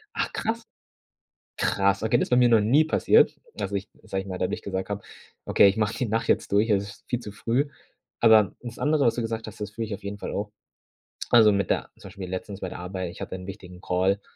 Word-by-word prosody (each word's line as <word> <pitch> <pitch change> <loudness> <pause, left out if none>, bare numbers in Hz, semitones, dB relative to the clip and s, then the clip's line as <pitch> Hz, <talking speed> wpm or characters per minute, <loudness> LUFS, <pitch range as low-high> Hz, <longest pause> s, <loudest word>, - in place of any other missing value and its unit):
Ach, - - -1
krass. 225 +1 -2 1.0
Krass. 100 +1 +2
Okay, 110 +2 +3
das - - +1
ist - - -15
bei 125 - +4
mir 125 -1 +6
noch 115 -2 +5
nie 135 +9 +4
passiert, 160 - +4 0.2
dass - - -4
ich, 100 0 -3
sage 95 -3 -3
ich 95 - -13
mal, 90 -1 -5
dadurch 90 - -2
gesagt 95 -1 -3
habe: 100 0 -4 0.4
„Okay, 100 - +6
ich 100 - 0
mache 110 +1 0
die 125 - -1
Nacht 115 +2 -1
jetzt - - +1
durch, 105 +3 +3
es 100 -1 +3
ist 100 - -13
viel 120 -1 -1
zu 105 - -8
früh.“ 120 +7 0 0.5
Aber, 110 -4 +6
das 120 -1 -8
andere, 150 -1 +2
was 115 - +3
du 120 - -2
gesagt 115 -1 -3
hast, 105 - -10
das 105 -1 -4
fühle 115 +1 -4
ich 105 - -4
auf - - -9
jeden 100 +1 -5
Fall - - -5
auch. 105 +1 -3 0.8
Also 110 -3 +7
mit 100 -2 0
der, - - 0
zum 100 - -11
Beispiel 95 -2 -8
letztens, 95 +2 -6
bei 95 - -3
der - - -8
Arbeit, 90 0 -4
ich - - -13
hatte - - -5
'n 90 0 -8
wichtigen 90 -2 -10
Call, 95 +2 +1
105 Hz, 245 wpm, -26 LUFS, 95-115 Hz, 1.0 s, Also